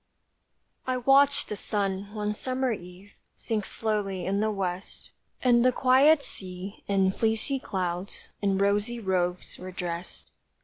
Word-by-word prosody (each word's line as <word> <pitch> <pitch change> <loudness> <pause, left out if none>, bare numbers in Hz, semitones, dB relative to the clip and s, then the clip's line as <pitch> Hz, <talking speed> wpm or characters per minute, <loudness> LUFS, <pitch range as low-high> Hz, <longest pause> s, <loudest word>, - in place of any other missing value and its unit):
I 255 0 +1
watched 275 +3 +4
the 210 - -4
sun 200 -1 -2
one 210 0 -1
summer 255 +3 -1
eve 185 0 -8 0.2
Sink 215 -3 -2
slowly 205 -4 -2
in 200 +1 0
the 215 +1 +1
west, 190 -2 -4 0.3
And 240 -2 +5
the 255 - +5
quiet 275 +4 +5
sea 185 -1 -7
and 195 -1 +2
fleecy 225 +5 0
clouds 180 -3 -4
In 195 -2 +1
rosy 205 +4 +1
robes 180 -3 -1
were 185 - -7
dressed. 175 -1 -6
205 Hz, 135 wpm, -27 LUFS, 190-240 Hz, 0.3 s, And